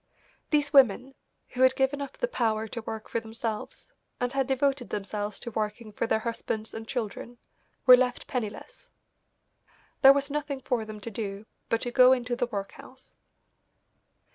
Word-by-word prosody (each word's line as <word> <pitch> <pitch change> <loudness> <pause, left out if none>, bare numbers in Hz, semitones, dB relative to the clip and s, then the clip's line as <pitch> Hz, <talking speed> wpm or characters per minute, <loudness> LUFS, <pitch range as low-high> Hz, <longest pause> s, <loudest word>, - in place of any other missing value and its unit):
These 295 -2 +1
women, 260 0 +5 0.4
who 255 - -4
had 260 0 +6
given 275 +2 +1
up 280 - -5
the - - -2
power 220 - 0
to 230 +2 -5
work 220 0 -6
for 230 - -1
themselves, 225 -1 -6 0.3
and 245 +1 -1
had 270 -1 0
devoted 270 -1 0
themselves 205 +1 -4
to 235 - -5
working 215 +1 -3
for 225 - -2
their - - +2
husbands 225 -1 -3
and 225 0 -7
children, 240 0 -5 0.5
were 255 - +11
left 250 -1 0
penniless. 240 -7 -6 1.1
There 270 - +9
was 280 0 0
nothing 290 -2 -3
for 245 -3 -1
them 215 -1 -8
to 230 - -6
do 200 -1 -5 0.2
but 230 - +1
to 245 - -3
go 255 +1 +7
into 245 -1 -1
the 245 0 -1
workhouse. 235 +4 -8
245 Hz, 165 wpm, -28 LUFS, 220-265 Hz, 1.1 s, were